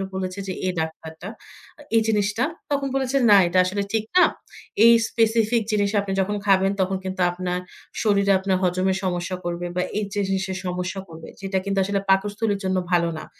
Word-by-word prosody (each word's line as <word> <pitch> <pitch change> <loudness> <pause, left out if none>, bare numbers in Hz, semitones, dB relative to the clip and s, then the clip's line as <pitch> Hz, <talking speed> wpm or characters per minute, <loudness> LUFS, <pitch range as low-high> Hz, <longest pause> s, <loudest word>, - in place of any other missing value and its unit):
বলেছে 185 0 -4
যে, 185 - -2
"এই 185 - 0
ডাক্তারটা, 160 +2 -7 0.7
এই 225 - +5
জিনিসটা।" 210 +1 +1 0.3
তখন 280 -1 0
বলেছে, 270 0 0
"না, 205 - +8
এটা 180 +2 +2
আসলে 200 +2 -1
ঠিক 220 -1 +1
না। 360 - +8 0.6
এই 235 - +9 0.2
স্পেসিফিক 225 0 +2
জিনিস 205 -1 +1
আপনি 200 -1 -5
যখন 205 +2 -1
খাবেন, 195 0 +4
তখন 190 +1 0
কিন্তু 185 -1 -4
আপনার 180 0 -3 0.4
শরীরে 200 -2 +3
আপনার 190 -1 0
হজমের 185 +1 +1
সমস্যা 180 0 -2
করবে, 175 0 -3
বা 180 - +1 0.2
এই 210 - -1 0.2
জিনিসের 190 -1 -2
সমস্যা 180 +2 -3
করবে। 160 0 -11
যেটা 195 0 -2
কিন্তু 200 0 -2
আসলে 200 +1 -1
পাকস্থলীর 205 +2 +1
জন্য 190 0 0
ভালো 170 -1 +3
না।" - - -9
195 Hz, 175 wpm, -23 LUFS, 185-205 Hz, 0.7 s, এই